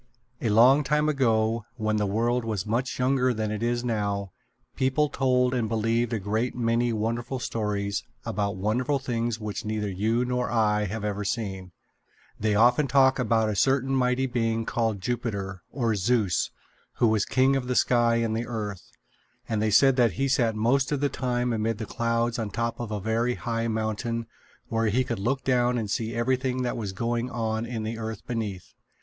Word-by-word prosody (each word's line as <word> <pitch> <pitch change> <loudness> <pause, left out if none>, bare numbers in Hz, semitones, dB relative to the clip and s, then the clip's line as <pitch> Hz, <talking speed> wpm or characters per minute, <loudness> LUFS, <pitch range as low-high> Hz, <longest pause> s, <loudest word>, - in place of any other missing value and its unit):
A 115 - 0
long 125 +7 +6
time 150 +2 +1
ago, 115 -5 +1
when 110 -1 0
the 105 -1 +1
world 120 +4 +1
was 110 -5 -2
much 120 +4 -1
younger 125 -1 +2
than 110 -1 -2
it 110 0 -3
is 120 +1 0
now, 100 -4 -2 0.4
people 135 +3 +1
told 125 -2 +2
and 115 -4 0
believed 115 +1 0
a 115 - 0
great 110 +5 -1
many 120 0 +1
wonderful 115 +4 -2
stories 105 -4 -2 0.2
about 100 -1 -1
wonderful 120 +9 0
things 120 -4 -2
which 105 +1 -4
neither 105 -1 -2
you 110 +6 0
nor 125 0 -1
I 105 -2 +2
have 105 +2 -4
ever 105 0 -2
seen. 95 -4 -3 0.7
They 105 -1 +1
often 125 +6 +4
talked 130 0 +4
about 110 -2 +2
a 105 - -1
certain 135 +4 +2
Mighty 125 0 +2
Being 115 -3 -1
called 110 -4 -1
Jupiter, 100 -5 -3
or 120 -5 0
Zeus, 105 -2 +1 0.4
who 120 - +2
was 110 -2 +2
king 130 +5 +3
of 130 -2 -2
the 125 - -1
sky 120 -2 +3
and 115 -1 0
the 115 +1 -2
earth; 105 -5 -5 0.6
and 110 -2 -1
they 110 - +2
said 135 +5 +5
that 120 -6 +4
he 135 +10 0
sat 120 -4 +2
most 125 +6 +2
of 145 - 0
the 145 0 +1
time 125 -1 -1
amid 110 0 -1
the 110 - -4
clouds 115 +1 -1
on 110 - -1
the 100 - -11
top 115 +1 -2
of 120 -2 -4
a 105 -1 -3
very 115 +4 0
high 115 -1 -2
mountain 110 +1 -2 0.4
where 115 0 0
he 120 +5 +2
could 120 -3 -4
look 130 +6 -1
down 125 -1 +2
and 110 -4 -3
see 115 +1 -2
everything 130 +1 0
that 120 - -1
was 105 -4 -4
going 120 +4 -2
on 115 -1 -2
in 115 -2 -4
the 110 +1 -4
earth 110 -2 -5
beneath. 105 -6 -4
115 Hz, 190 wpm, -26 LUFS, 110-125 Hz, 0.7 s, long